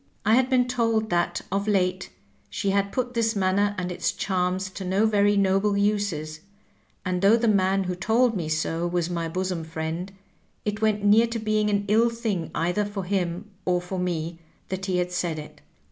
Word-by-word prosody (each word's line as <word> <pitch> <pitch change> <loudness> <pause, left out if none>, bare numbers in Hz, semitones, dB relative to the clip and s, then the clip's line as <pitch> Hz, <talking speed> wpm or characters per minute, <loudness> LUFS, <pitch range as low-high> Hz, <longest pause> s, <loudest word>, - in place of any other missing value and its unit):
I 215 - +4
had 255 +2 +4
been 250 -2 +3
told 230 -3 0
that 175 0 0
of 200 +1 -1
late 185 -2 +1 0.4
she 200 -3 -1
had 200 0 +1
put 250 -1 -2
this 230 -1 +1
manner 200 +1 +1
and 180 0 -3
its 175 - -1
charms 185 0 -1
to 190 - -7
no 190 +4 +2
very 205 -1 +3
noble 200 +1 +2
uses, 200 -7 -1 0.7
and 180 -1 -1
though 205 +4 +6
the 235 0 0
man 195 -2 +3
who 180 -1 -2
told 225 +6 +2
me 165 -5 -3
so 165 +2 -1
was 175 0 -1
my 170 -1 -2
bosom 185 -1 -2
friend, 160 +3 -4 0.5
it 210 +1 -2
went 210 -2 +1
near 220 +3 +6
to 230 0 -3
being 215 -1 +1
an 205 -1 0
ill 225 +3 +4
thing 220 -8 -3
either 180 +5 +1
for 205 -1 -4
him 185 +1 -2
or 180 -1 +1
for 180 +1 -5
me 170 -2 -2 0.3
that 190 +1 -4
he 185 -1 0
had 180 0 -1
said 175 -2 -2
it. 150 - -10
195 Hz, 190 wpm, -25 LUFS, 180-210 Hz, 0.7 s, though